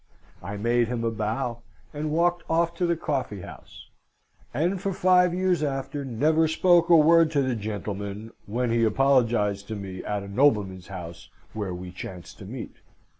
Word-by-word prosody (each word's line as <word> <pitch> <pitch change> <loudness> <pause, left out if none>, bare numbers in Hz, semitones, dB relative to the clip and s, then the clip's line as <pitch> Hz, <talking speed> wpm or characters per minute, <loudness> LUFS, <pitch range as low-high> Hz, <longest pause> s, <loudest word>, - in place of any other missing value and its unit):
I 100 +1 -6
made 120 +2 +2
him 120 -1 -3
a 115 - 0
bow, 115 +2 -2 0.3
and 150 +1 -3
walked 175 +2 +1
off 170 +1 +2
to 180 - +1
the 170 -1 +1
coffee 130 - -3
house, - - -12 0.6
and 175 +8 0
for 195 - -1
five 180 -1 +4
years 180 -1 +1
after 140 0 -3
never 155 +6 +2
spoke 170 +1 +3
a 170 - +8
word 165 +1 +6
to 140 -2 +2
the 130 -1 0
gentleman, 105 0 -5 0.2
when 120 +3 -1
he 115 0 +2
apologised 115 -4 +2
to 110 - -4
me, 95 -2 -7
at 105 -1 -3
a - - -8
nobleman's 100 -5 +1
house 85 -3 -9 0.2
where 100 -4 -4
we 90 0 -8
chanced 90 -1 -9
to - - -9
meet. - - -8
120 Hz, 175 wpm, -26 LUFS, 105-160 Hz, 0.6 s, a